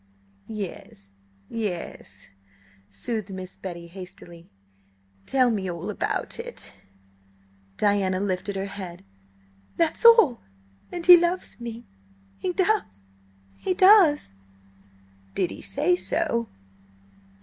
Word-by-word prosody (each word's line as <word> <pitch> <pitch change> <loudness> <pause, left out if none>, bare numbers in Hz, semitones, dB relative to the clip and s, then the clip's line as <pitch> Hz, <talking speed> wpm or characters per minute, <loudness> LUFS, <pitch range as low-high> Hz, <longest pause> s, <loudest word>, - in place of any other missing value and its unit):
"Yes, 180 - -8 0.4
yes," 175 - -6 0.6
soothed 220 -5 -3
Miss 185 0 -7
Betty 170 -2 -8
hastily. 175 -1 -11 0.8
"Tell 255 -2 +3
me 195 -4 -2
all 175 +4 -4
about - - -2
it." 485 +1 -6 1.0
Diana 195 -2 +1
lifted 195 0 -2
her 195 0 -2
head. 185 - -8 0.7
"That's 335 +5 +2
all. 450 - +7 0.5
And 345 -1 -5
he 355 -1 +11
loves 345 -2 -1
me–he 95 - -8
does–he 95 - -3
does!" 370 - +6 1.0
"Did 180 -3 0
he - - -9
say 310 +6 +1
so?" 235 - 0
200 Hz, 95 wpm, -25 LUFS, -, 1.0 s, he